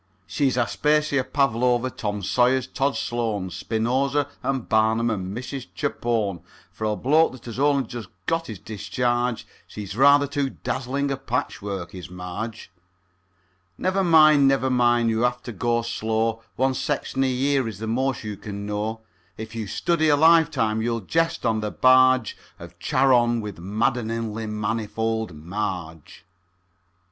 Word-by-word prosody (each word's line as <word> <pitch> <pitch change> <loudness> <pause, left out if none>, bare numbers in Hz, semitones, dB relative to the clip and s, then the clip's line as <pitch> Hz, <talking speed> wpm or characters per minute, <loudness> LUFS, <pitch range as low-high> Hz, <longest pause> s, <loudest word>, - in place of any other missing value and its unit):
She's 135 0 0
Aspasia, 150 +3 +1
Pavlova, 125 -2 +1
Tom 105 -3 -4
Sayers, 125 +5 +2
Tod 140 +1 -1
Sloan, 110 -6 -2
Spinoza, 130 - 0
and 135 -3 -2
Barnum, 110 +1 +2
and 95 0 -4
Mrs. 130 +1 -6
Chapone; 115 - -1 0.3
For 110 - -5
a 105 0 0
bloke 150 +6 +3
that 130 - -13
has 120 +1 -6
only 140 -1 +3
just 120 -4 -8 0.2
got 165 0 -1
his 110 - -6
discharge, 120 +4 -2 0.2
She's 100 -2 -7
rather 140 +3 +6
too 140 -1 -1
dazzling 135 +3 -2
a 135 - -1
patchwork, 100 -8 -4
is 90 -2 -8
Marge. 90 +4 -6 1.1
Never 190 +1 0
mind, 155 -4 +6
never 135 -1 +2
mind, 120 -2 +3
you 110 0 0
have 125 0 +3
got - - -24
to 120 - -6
go 115 +2 0
slow, 110 0 -1
One 130 +1 +1
section 135 0 -1
a 130 - +2
year 135 0 +1
is 110 -4 -6
the 110 - -5
most 130 +2 -1
you 105 -2 -5
can 100 -1 -7
know; 105 +2 -3 0.4
If 110 +1 -7
you 110 -2 -4
study 160 - +1
a 145 - +5
life 160 +1 +5
time, 110 -6 0
you'll 115 0 -1
jest 165 - 0
on 110 -1 +2
the 105 0 -2
barge 130 -1 +4 0.2
Of - - -12
Charon 120 -3 +3
with 105 -5 -6
madd'ningly 110 +2 -2
manifold 110 -1 -2
Marge. 85 -1 -5
120 Hz, 150 wpm, -24 LUFS, 110-135 Hz, 1.1 s, rather